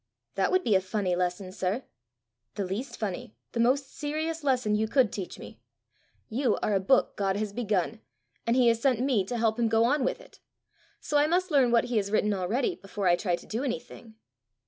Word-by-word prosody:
"That -, -, +1 dB
would 370 Hz, 0 st, +3 dB
be 220 Hz, -, +2 dB
a 190 Hz, -, +4 dB
funny 190 Hz, -1 st, -1 dB
lesson, 180 Hz, +1 st, -2 dB
sir!" 190 Hz, +6 st, -2 dB, 0.7 s
"The 200 Hz, -, -1 dB
least 210 Hz, +9 st, -4 dB
funny, 205 Hz, -1 st, -4 dB, 0.2 s
the 235 Hz, -, -4 dB
most 265 Hz, +3 st, +1 dB
serious 315 Hz, +1 st, -3 dB
lesson 255 Hz, -6 st, +1 dB
you 215 Hz, +1 st, +1 dB
could 255 Hz, -2 st, +2 dB
teach 190 Hz, -3 st, -5 dB
me! -, -, -11 dB, 0.7 s
You 245 Hz, 0 st, +1 dB
are 210 Hz, -, +1 dB
a 195 Hz, -, +3 dB
book 225 Hz, +8 st, +2 dB
God 195 Hz, -1 st, 0 dB
has 210 Hz, -1 st, -3 dB
begun, 215 Hz, -1 st, -1 dB, 0.5 s
and 230 Hz, -, +3 dB
he 255 Hz, -2 st, +4 dB
has 230 Hz, 0 st, +1 dB
sent 255 Hz, -3 st, +2 dB
me 250 Hz, -6 st, +2 dB
to 240 Hz, +5 st, -3 dB
help 225 Hz, 0 st, +1 dB
him 230 Hz, -1 st, +2 dB
go 225 Hz, 0 st, +3 dB
on 270 Hz, +4 st, +2 dB
with 255 Hz, -, -1 dB
it; -, -, -17 dB, 0.6 s
so 295 Hz, -, +1 dB
I 295 Hz, -, +4 dB
must 360 Hz, +2 st, +1 dB
learn 270 Hz, -4 st, +4 dB
what 235 Hz, -1 st, +4 dB
he 245 Hz, -2 st, -1 dB
has 200 Hz, -1 st, 0 dB
written 210 Hz, 0 st, +2 dB
already 205 Hz, -, 0 dB
before 200 Hz, -, -4 dB
I 175 Hz, -, +6 dB
try 175 Hz, -1 st, 0 dB
to -, -, -13 dB
do 230 Hz, +5 st, -3 dB
anything." 240 Hz, -3 st, -6 dB
230 Hz, 215 wpm, -28 LUFS, 200-265 Hz, 0.7 s, I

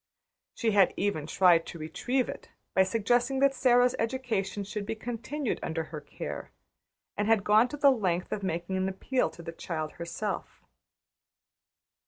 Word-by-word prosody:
She 225 Hz, -2 st, +1 dB
had 200 Hz, -3 st, +4 dB
even 185 Hz, -7 st, -1 dB
tried 175 Hz, -1 st, +4 dB
to -, -, -7 dB
retrieve 245 Hz, +12 st, -1 dB
it -, -, -8 dB, 0.2 s
by 190 Hz, -, +5 dB
suggesting 240 Hz, +7 st, +2 dB
that 275 Hz, 0 st, +5 dB
Sara's 245 Hz, -1 st, +4 dB
education 225 Hz, -5 st, -1 dB
should 205 Hz, +1 st, -4 dB
be 215 Hz, -, -3 dB
continued 245 Hz, +4 st, -3 dB
under 160 Hz, -1 st, -2 dB
her 155 Hz, -1 st, -8 dB
care, -, -, -7 dB, 0.7 s
and 205 Hz, 0 st, -1 dB
had 225 Hz, -3 st, +4 dB
gone 215 Hz, +4 st, +5 dB
to 295 Hz, -, -7 dB
the 280 Hz, -1 st, +6 dB
length 185 Hz, -8 st, -1 dB
of 205 Hz, -, -2 dB
making 185 Hz, 0 st, -2 dB
an 190 Hz, 0 st, 0 dB
appeal 250 Hz, +7 st, 0 dB
to 170 Hz, -, -12 dB
the 165 Hz, -, -5 dB
child 160 Hz, -2 st, -4 dB
herself. 185 Hz, +5 st, -4 dB
205 Hz, 160 wpm, -29 LUFS, 175-245 Hz, 0.7 s, the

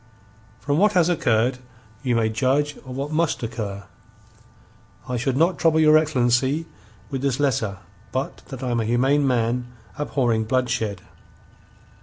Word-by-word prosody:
From 145 Hz, +2 st, 0 dB
what 210 Hz, +1 st, +4 dB
has 180 Hz, -2 st, +3 dB
occurred, 125 Hz, -6 st, +1 dB, 0.4 s
you 125 Hz, -3 st, 0 dB
may 115 Hz, -1 st, +2 dB
judge 135 Hz, +6 st, 0 dB
of 130 Hz, -2 st, -10 dB
what 140 Hz, +2 st, -4 dB
must 160 Hz, -4 st, 0 dB
occur. 105 Hz, -4 st, -4 dB, 1.2 s
I 125 Hz, -, -2 dB
should 130 Hz, +2 st, -1 dB
not 170 Hz, +4 st, +2 dB
trouble 160 Hz, -1 st, +3 dB
your 155 Hz, -1 st, +6 dB
excellency 135 Hz, 0 st, +2 dB, 0.5 s
with 135 Hz, -, -3 dB
this 135 Hz, -1 st, 0 dB
letter 110 Hz, -8 st, 0 dB, 0.3 s
but -, -, -3 dB
that -, -, -8 dB
I 125 Hz, -, -1 dB
am 120 Hz, -, +1 dB
a 110 Hz, -, -1 dB
humane 135 Hz, +5 st, +2 dB
man, 120 Hz, 0 st, 0 dB, 0.3 s
abhorring 120 Hz, -6 st, 0 dB
bloodshed. 115 Hz, -5 st, -1 dB
130 Hz, 145 wpm, -23 LUFS, 120-145 Hz, 1.2 s, your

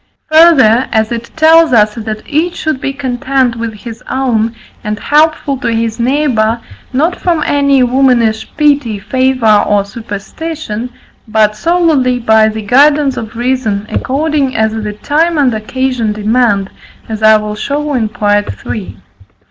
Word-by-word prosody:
Further, 275 Hz, -8 st, +5 dB
as 220 Hz, 0 st, 0 dB
it 235 Hz, 0 st, -5 dB
tells 320 Hz, -1 st, +4 dB
us 210 Hz, -2 st, +4 dB
that 215 Hz, -1 st, -6 dB
each 330 Hz, +4 st, -1 dB
should 310 Hz, -4 st, -3 dB
be 275 Hz, -, -2 dB
content 260 Hz, -2 st, -1 dB
with 230 Hz, 0 st, -4 dB
his 230 Hz, +2 st, -10 dB
own, 230 Hz, -4 st, -1 dB, 0.3 s
and 210 Hz, 0 st, -3 dB
helpful 300 Hz, 0 st, +1 dB
to 235 Hz, -, -2 dB
his 225 Hz, 0 st, -2 dB
neighbour, 240 Hz, -3 st, +1 dB, 0.3 s
not 310 Hz, +7 st, 0 dB
from 335 Hz, -4 st, -1 dB
any 280 Hz, -2 st, +2 dB
womanish 245 Hz, -4 st, +1 dB
pity, 285 Hz, -7 st, +1 dB
favour, 255 Hz, -1 st, +2 dB
or 205 Hz, -1 st, +1 dB
superstition, 230 Hz, +4 st, -6 dB, 0.4 s
but 215 Hz, -1 st, +1 dB
solely 300 Hz, -2 st, +1 dB
by 220 Hz, -2 st, +3 dB
the 220 Hz, 0 st, -6 dB
guidance 280 Hz, +4 st, +3 dB
of 220 Hz, 0 st, -7 dB
reason, 235 Hz, -4 st, -1 dB
according 285 Hz, -1 st, -1 dB
as 220 Hz, 0 st, +1 dB
the 215 Hz, -1 st, -4 dB
time 315 Hz, +9 st, 0 dB
and 270 Hz, -5 st, +2 dB
occasion 235 Hz, 0 st, -2 dB
demand, 210 Hz, -2 st, 0 dB, 0.4 s
as 220 Hz, -1 st, -5 dB
I 215 Hz, 0 st, +6 dB
will 210 Hz, 0 st, -4 dB
show 290 Hz, +7 st, -3 dB
in 230 Hz, -5 st, 0 dB
Part 205 Hz, -1 st, 0 dB, 0.2 s
III. 200 Hz, -, -5 dB
4. 95 Hz, -, -23 dB
245 Hz, 150 wpm, -12 LUFS, 220-280 Hz, 0.4 s, I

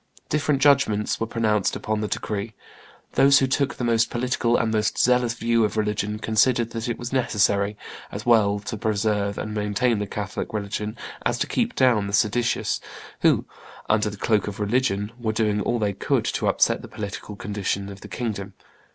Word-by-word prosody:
Different 150 Hz, -2 st, +1 dB
judgments 140 Hz, -8 st, +3 dB
were 115 Hz, -, -1 dB
pronounced 110 Hz, -4 st, +1 dB
upon 110 Hz, -1 st, -2 dB
the 105 Hz, -, -1 dB
decree: 105 Hz, +1 st, -4 dB, 0.6 s
those 140 Hz, 0 st, +6 dB
who 135 Hz, -, +4 dB
took 135 Hz, +1 st, 0 dB
the -, -, -5 dB
most 115 Hz, -1 st, +2 dB
political 120 Hz, -1 st, +1 dB
and 110 Hz, -1 st, 0 dB
most 105 Hz, -1 st, 0 dB
zealous 125 Hz, -1 st, +3 dB
view 115 Hz, 0 st, +2 dB
of 105 Hz, +1 st, -1 dB
religion 105 Hz, 0 st, -1 dB
considered 115 Hz, +2 st, +2 dB
that 115 Hz, +1 st, -4 dB
it 120 Hz, -, -2 dB
was 120 Hz, +1 st, -6 dB
necessary, 105 Hz, -4 st, +1 dB, 0.3 s
as 105 Hz, +1 st, -6 dB
well 110 Hz, -4 st, +4 dB
to 105 Hz, +2 st, -5 dB
preserve 105 Hz, -1 st, 0 dB
and 110 Hz, -, -4 dB
maintain 105 Hz, +2 st, +1 dB
the 105 Hz, -, -3 dB
Catholic 100 Hz, 0 st, -5 dB
religion 105 Hz, +1 st, -3 dB, 0.3 s
as 120 Hz, 0 st, +1 dB
to -, -, 0 dB
keep 240 Hz, +1 st, -1 dB
down 120 Hz, -6 st, +3 dB
the 100 Hz, -, -6 dB
seditious, 115 Hz, +3 st, +1 dB, 0.4 s
who, -, -, +3 dB, 0.5 s
under 105 Hz, 0 st, +2 dB
the 105 Hz, -, -9 dB
cloak 105 Hz, 0 st, +1 dB
of 105 Hz, 0 st, -6 dB
religion, 105 Hz, -1 st, 0 dB
were 110 Hz, -2 st, -1 dB
doing 105 Hz, -1 st, +1 dB
all 120 Hz, -, 0 dB
they 105 Hz, -3 st, 0 dB
could 95 Hz, -, 0 dB
to -, -, -1 dB
upset -, -, +2 dB
the -, -, -9 dB
political 105 Hz, 0 st, -6 dB
condition 100 Hz, -1 st, -3 dB
of 100 Hz, 0 st, -10 dB
the -, -, -9 dB
kingdom. 100 Hz, -5 st, -4 dB
110 Hz, 185 wpm, -24 LUFS, 105-120 Hz, 0.6 s, those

